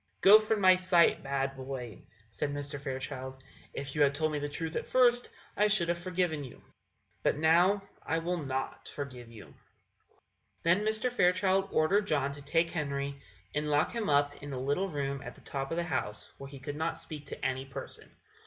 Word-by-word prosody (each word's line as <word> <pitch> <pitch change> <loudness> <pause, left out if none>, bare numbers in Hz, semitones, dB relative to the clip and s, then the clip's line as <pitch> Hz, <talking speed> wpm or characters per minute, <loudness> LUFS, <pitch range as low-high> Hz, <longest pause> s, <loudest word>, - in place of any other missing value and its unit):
"Go 205 +3 +9
from 215 -1 0
my 185 -1 +7
sight, 185 -2 +4
bad 135 0 -1
boy!" 130 -4 -6 0.3
said 145 +6 -3
Mr. 145 0 -5
Fairchild; 130 -1 -5 0.3
"if 135 -1 -5
you 150 - +1
had 140 -1 +4
told 155 +1 0
the 145 0 -2
truth 160 +2 -4
at - - -2
first, 245 -1 +4 0.3
I 210 - +4
should 200 -5 +2
have 170 - +1
forgiven 175 -4 -1
you, 130 - -10 0.6
but - - +1
now 175 +6 +4 0.2
I 160 - -1
will 170 0 -2
not 135 -1 -4
forgive 130 -5 -7
you." 115 -2 -13 1.1
Then 170 +3 +4
Mr. 220 +3 +1
Fairchild 190 -1 +3
ordered 200 +7 +3
John 140 -4 +1
to 145 - -10
take 165 +4 +1
Henry, 140 -3 -3 0.3
and 150 +1 -1
lock 150 +1 +2
him 230 -6 -2
up 145 0 +3
in 145 0 -7
a 130 - -3
little 145 +9 0
room 140 -3 -3
at - - -8
the - - -17
top 135 -1 -4
of 165 - -2
the 170 - +1
house, 105 -10 -3
where 135 - -8
he 140 - -10
could 140 +2 -6
not 160 +1 -1
speak 150 -3 -8
to - - -6
any 130 0 -1
person. 135 - -7
150 Hz, 190 wpm, -31 LUFS, 140-180 Hz, 1.1 s, Go